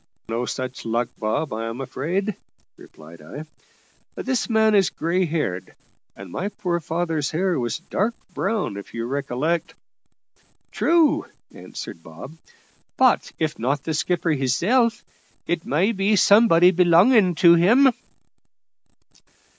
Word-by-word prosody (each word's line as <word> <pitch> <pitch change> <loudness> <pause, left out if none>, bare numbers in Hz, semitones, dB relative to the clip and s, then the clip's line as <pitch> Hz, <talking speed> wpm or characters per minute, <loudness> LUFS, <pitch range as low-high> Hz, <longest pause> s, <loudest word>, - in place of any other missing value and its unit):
"No 115 +2 -2
such 130 0 -5
luck, 115 +1 -1
Bob, 110 +6 -2
I 115 +1 -4
am 115 +2 -6
afraid," 175 - -3 0.4
replied 80 +1 -15
I; 135 - -9 0.7
"this 260 -2 -2
man 220 -1 +3
is 195 -3 +4
grey 180 +3 -1
haired, 150 - -3 0.4
and 95 -2 -11
my 195 - -3
poor 175 -4 -3
father's 165 -2 -2
hair 180 0 -1
was 120 -2 -2
dark 210 +6 -2 0.2
brown, 215 - -2
if 100 - -10
you 115 0 -3
recollect." 140 +5 -2 1.0
"True," 330 -3 +2 0.3
answered 85 - -9
Bob; 80 - -11 0.6
"but - - +3
if 155 -1 -2
not 135 +4 -1
the 160 - -3
skipper 170 +1 -1
hisself, 205 - +1 0.4
it 170 -1 -3
may 175 +10 +1
be 205 0 +1
somebody 195 -3 +5
belonging 180 +3 +4
to 170 +2 +6
him." 230 +11 +5
165 Hz, 125 wpm, -22 LUFS, 130-195 Hz, 1.0 s, to